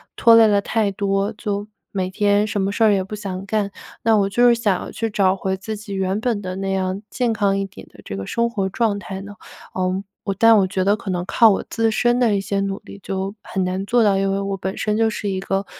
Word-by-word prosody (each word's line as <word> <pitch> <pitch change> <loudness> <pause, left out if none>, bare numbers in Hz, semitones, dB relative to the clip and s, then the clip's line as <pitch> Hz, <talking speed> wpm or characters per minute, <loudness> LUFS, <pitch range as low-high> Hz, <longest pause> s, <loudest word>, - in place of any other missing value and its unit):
拖 230 -2 +6
累 225 -1 +7
了 205 -1 +3
太 215 -1 0
多， 195 +1 0
就 205 -2 -3 0.2
每 185 -2 -2
天 205 +1 +2
什 205 -1 -1
么 195 +1 0
事 225 - 0
儿 215 - +5
也 195 -1 +1
不 195 +3 -7
想 195 -2 -5
干。 205 -1 -1 0.3
那 225 0 +4
我 195 -1 +2
就 240 +4 +4
是 240 - +6
想 210 -5 -1
去 225 0 -2
找 195 -2 +2
回 190 0 -2
自 215 +3 -5
己 205 -1 -8
原 190 +1 -1
本 230 -4 -1
的 185 -2 -5
那 195 0 -2
样 190 0 -1
健 245 0 0
康 200 -3 +1
一 195 - -1
点 190 - -12
的 110 - -18
这 95 - -5
个 95 - -5
生 235 - 0
活 200 -5 -1
状 215 +1 0
态 195 -1 -7
呢， 200 +1 -9 0.4
呃， 185 +1 -1 0.4
但 230 0 +7
我 195 - +4
觉 185 0 -1
得 200 +1 +4
可 200 - -7
能 175 -1 -2
靠 225 +4 +5
我 195 - +1
自 225 -1 +1
身 240 +2 +2
的 230 -4 +3
一 - - -1
些 195 0 -2
努 195 0 -2
力 - - -12
就 195 +1 -3
很 190 - -2
难 185 +2 -2
做 235 +3 +3
到， 200 -2 +3
因 195 0 +1
为 195 - 0
我 195 0 -2
本 190 +1 -4
身 210 -1 0
就 225 0 +3
是 210 -1 -3
一 190 -1 -2
个 195 +1 -1
200 Hz, 275 characters per minute, -21 LUFS, 190-215 Hz, 0.4 s, 累